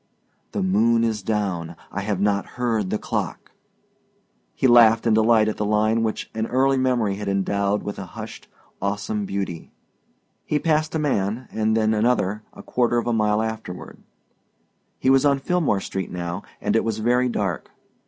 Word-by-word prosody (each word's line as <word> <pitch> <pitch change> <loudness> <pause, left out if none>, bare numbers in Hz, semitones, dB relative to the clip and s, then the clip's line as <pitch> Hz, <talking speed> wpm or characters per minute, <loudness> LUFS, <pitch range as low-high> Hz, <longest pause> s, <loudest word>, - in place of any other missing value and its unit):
"The - - -1
moon 115 +5 +3
is 110 -2 0
down 95 -6 -2 0.2
I - - -3
have 100 -2 -2
not 100 0 +1
heard 115 -5 0
the 105 - 0
clock!" - - -4 1.0
He - - -1
laughed 115 -2 +6
in 115 - +3
delight 110 0 +4
at 110 - -2
the - - -1
line 110 +2 +2
which 110 -1 -3
an 110 0 -2
early 135 +2 +2
memory 120 -6 +1
had 105 0 -5
endowed 100 +1 0
with 105 - -5
a 100 - -5
hushed - - -8 0.3
awesome 105 +1 -2
beauty. 95 -4 -4 0.7
He 150 - 0
passed 155 0 0
a - - +3
man 125 -5 -1
and 110 0 +1
then 110 0 +2
another 105 -2 +1
a - - -12
quarter 120 -1 +1
of 120 - 0
mile 105 -1 +2
afterward. 110 -5 -6 1.0
He 130 - +2
was 135 +1 +5
on 140 -1 +4
Philmore 145 - 0
Street 95 -2 -4
now 85 +1 -4 0.2
and - - 0
it 115 - +3
was 115 -1 -2
very 125 +3 +2
dark. 95 -8 -2
110 Hz, 170 wpm, -23 LUFS, 100-120 Hz, 1.0 s, laughed